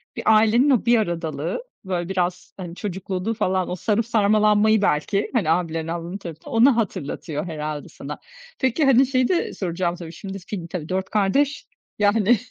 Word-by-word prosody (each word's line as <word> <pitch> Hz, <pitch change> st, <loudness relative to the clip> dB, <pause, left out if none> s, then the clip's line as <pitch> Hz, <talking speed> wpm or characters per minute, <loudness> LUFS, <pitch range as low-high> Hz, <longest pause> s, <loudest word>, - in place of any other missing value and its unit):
bir -, -, -5 dB
ailenin 225 Hz, +6 st, +4 dB
o 255 Hz, -5 st, +3 dB
bir 235 Hz, 0 st, +5 dB
aradalığı, 170 Hz, -, -2 dB, 0.2 s
böyle 175 Hz, -1 st, -2 dB
biraz, 180 Hz, -1 st, -2 dB
hani 175 Hz, -2 st, -7 dB
çocukluğunu 190 Hz, +1 st, -3 dB
falan. 190 Hz, -4 st, 0 dB
O 180 Hz, -, -2 dB
sarıp 215 Hz, +5 st, 0 dB
sarmalanmayı 215 Hz, -1 st, +4 dB
belki, 195 Hz, +4 st, 0 dB
hani, 200 Hz, -11 st, +1 dB
abilerin, 165 Hz, -1 st, 0 dB
ablaların 170 Hz, +3 st, -4 dB
tarafından, 165 Hz, -4 st, -9 dB
onu 240 Hz, +3 st, +5 dB
hatırlatıyor 165 Hz, -6 st, -3 dB
herhâlde 150 Hz, -2 st, -5 dB
sana. 145 Hz, +2 st, -8 dB, 0.4 s
Peki, 260 Hz, +3 st, +2 dB
hani, 265 Hz, 0 st, +6 dB
şeyi 255 Hz, -1 st, +2 dB
de 355 Hz, -, 0 dB
soracağım 175 Hz, -1 st, -2 dB
tabii, 170 Hz, -2 st, -8 dB
şimdi, 195 Hz, +3 st, -7 dB
film 180 Hz, -2 st, -6 dB
tabii 165 Hz, -3 st, -6 dB
4 190 Hz, 0 st, -2 dB
kardeş, 270 Hz, +8 st, +1 dB, 0.3 s
yani, 210 Hz, +2 st, +4 dB
190 Hz, 165 wpm, -23 LUFS, 170-220 Hz, 0.4 s, hani